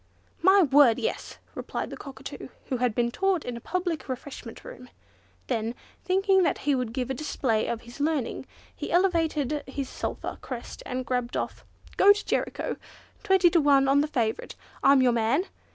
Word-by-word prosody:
"My 380 +2 +6
word! 275 -5 +5
yes," 470 - -3 0.2
replied - - -5
the - - -5
Cockatoo, 275 -2 -9 0.2
who 260 - 0
had 240 -3 0
been 235 0 +1
taught 385 +1 0
in 245 - -4
a 235 - -8
public 350 -3 -3
refreshment 255 -2 -7
room. 250 0 -10 0.6
Then, 230 -1 -2 0.3
thinking 385 +1 +3
that 355 - +2
he 290 - +3
would 250 -4 -1
give 255 +1 -3
a - - 0
display 250 -6 -1
of 230 -1 -3
his 240 +3 -13
learning, 290 -4 -1 0.3
he - - -5
elevated 325 -6 +1
his 270 0 -4
sulphur - - -5
crest 245 -3 -7
and 255 0 -3
gabbled 250 -1 -2
off, - - -4 0.3
"Go 405 +1 +8
to 415 - -6
Jericho! - - -2 0.4
Twenty 380 -3 +4
to 335 - +4
one 280 -2 +4
on 275 +1 +4
the 300 - 0
favourite! 230 -7 -2 0.3
I'm 275 -1 +6
your 250 - +4
man! 235 +8 +2
275 Hz, 175 wpm, -27 LUFS, 245-335 Hz, 0.6 s, Go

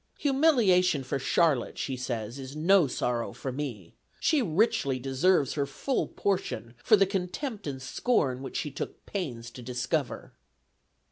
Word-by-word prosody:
"Humiliation 230 - +3
for 130 +1 -2
Charlotte," 140 -1 +2
she 135 - -2
says, 120 -1 -4
"is 135 +1 -8
no 170 +1 +4
sorrow 120 -2 -2
for 130 - -5
me. 125 - -5 0.3
She 310 -3 +3
richly 165 - +2
deserves 135 +4 +2
her 140 -2 -1
full 260 - -1
portion 185 - -2
for 215 - +6
the 195 -1 +4
contempt 195 - -3
and 135 -2 -4
scorn 130 - 0
which 135 - -5
she 150 - -3
took 140 - -6
pains 120 - -4
to 125 - -10
discover." 125 +4 -2
145 Hz, 145 wpm, -28 LUFS, 130-195 Hz, 0.3 s, for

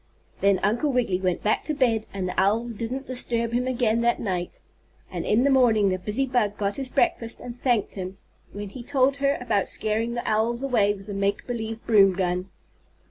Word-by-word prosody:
Then 200 -1 +3
Uncle 240 +8 +1
Wiggily 230 -8 0
went 180 -2 -1
back 215 - +1
to 305 - -2
bed, 230 -5 +1
and 190 -2 -3
the 180 - -3
owls 225 +5 +1
didn't 240 +5 -4
disturb 235 -2 -1
him 250 +1 0
again 235 -3 +1
that 235 0 +2
night. 180 -5 -3 0.5
And - - -4
in 220 +4 +3
the 280 - +3
morning 225 -6 +4
the 185 0 -1
busy 210 +8 -1
bug 240 -6 0
got 200 -1 -1
his 270 -2 -3
breakfast 230 -2 0
and 240 -1 -8
thanked 240 -6 +1
him 190 0 -6 0.3
when 205 0 -6
he 245 - -9
told 270 +2 +1
her 280 0 +1
about 220 -5 0
scaring 225 +2 +1
the 240 - -4
owls 230 +4 0
away 230 -7 +2
with 195 -1 -12
the 205 - -6
make 200 +1 -1
believe 225 -2 -5
broom 200 -4 +5
gun. 180 0 -2
225 Hz, 200 wpm, -25 LUFS, 200-245 Hz, 0.5 s, broom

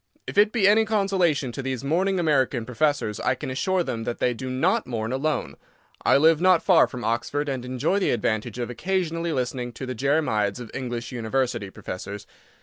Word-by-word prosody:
If - - -7
it 205 +1 +5
be 215 -5 +3
any 215 +2 +5
consolation 190 - +1
to 135 - -5
these 130 -2 -3
mourning 185 +6 +1
American 135 -7 +1
professors, 125 -3 0
I 130 - +1
can 130 - -6
assure 185 +7 0
them 115 -7 -4
that 120 - -3
they 125 - +1
do 130 +2 -6
not 130 +1 +1
mourn 115 -2 -3
alone. 150 +4 -2 0.5
I - - +5
live 160 +2 +4
not 185 -2 +4
far 180 -4 +5
from 125 -2 -7
Oxford, 120 +6 -1
and 130 -3 -3
enjoy 130 +10 0
the 195 - +1
advantage 110 -1 -1
of 120 0 -3
occasionally 170 +2 -1
listening 125 -3 -2
to 130 - -6
the 130 - -4
jeremiads 125 -6 0
of 120 -3 -8
English 120 -2 -4
University 120 -2 -1
professors. 100 +2 -7
130 Hz, 190 wpm, -25 LUFS, 120-165 Hz, 0.5 s, it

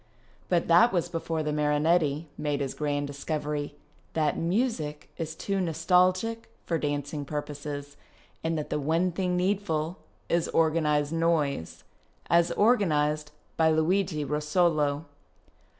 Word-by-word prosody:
But 175 -2 +2
that 195 +9 +6
was 175 -3 0
before 165 -1 -2
the 150 0 -1
Marinetti 150 +1 +2
made 145 -1 -2
his 135 -2 -2
grand 145 -1 -1
discovery 145 +1 -3 0.4
that 155 -2 +1
music 170 - -1
is 160 -1 -4
too 195 +3 -2
nostalgic 185 +6 +2 0.2
for 165 -2 0
dancing 145 0 -2
purposes 145 0 -5 0.5
and 165 0 0
that 150 - -4
the 150 - 0
one 165 +5 +1
thing 180 0 -1
needful 180 -3 -1 0.3
is 170 -1 +1
organized 155 -2 +2
noise 160 - 0 0.2
— - - -29
as 170 0 +4
organized 155 -9 +2 0.3
by 160 -1 +4
Luigi 160 0 +1
Russolo. 150 0 +1
160 Hz, 125 wpm, -28 LUFS, 150-175 Hz, 0.5 s, that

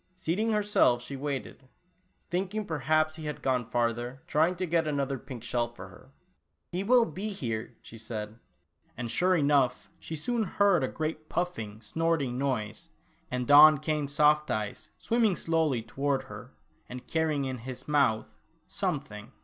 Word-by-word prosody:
Seating 190 +7 -1
herself 210 - +3
she 140 +3 -6
waited, 135 -1 -5 0.6
thinking 195 +4 -2
perhaps 155 0 +1
he 160 - -7
had 150 -1 -5
gone 125 -3 0
farther, 120 +3 -1
trying 165 +2 +2
to 185 +1 -2
get 165 -1 +1
another 140 -2 -1
pink 130 -3 -9
shell 120 -1 0
for 95 -5 -10
her. 130 +7 -16 0.6
"He 180 +2 -2
will 240 +2 +5
be 210 0 -5
here," 115 - -4
she 115 - -11
said, 110 0 -6 0.6
and 120 -1 -4
sure 185 +6 +3
enough 140 -5 +2
she 160 - -6
soon 235 +10 -1
heard 200 -5 +3
a - - +1
great 155 +1 -4
puffing, 110 -12 -3
snorting 150 -2 -1
noise, 115 -6 -2 0.4
and 125 +1 -1
on 150 +1 +9
came 150 0 -1
Soft 150 +1 +3
Eyes 105 -1 -3
swim 235 +1 0
ming 210 -5 +4
slowly 160 -9 0
toward 140 +2 -1
her, - - -11 0.3
and 125 0 -8
carrying 155 -3 0
in 130 -1 -4
his 130 +2 -8
mouth 140 -7 +1 0.2
— - - -42
something. - - -4
145 Hz, 160 wpm, -29 LUFS, 125-165 Hz, 0.6 s, on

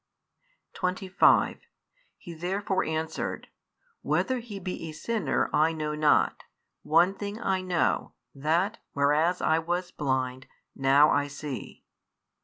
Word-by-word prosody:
25 185 +1 +2 0.6
He 170 - -10
therefore 190 +3 -1
answered, 160 0 -3 0.5
Whether 260 -1 0
He 220 -4 -8
be 180 -3 -5
a - - -8
sinner, 225 +7 -1
I 160 +2 +3
know 155 -1 -3
not: 150 -1 +2 0.4
one 170 +5 +3
thing 205 +2 -6
I 190 -5 0
know, 180 -2 0 0.2
that, 165 +10 0
whereas 150 +5 +2
I 160 +1 +3
was 175 +2 -2
blind, 130 -2 -2 0.3
now 140 +3 +5
I 145 0 +2
see. 145 -2 -7
165 Hz, 115 wpm, -27 LUFS, 150-185 Hz, 0.6 s, now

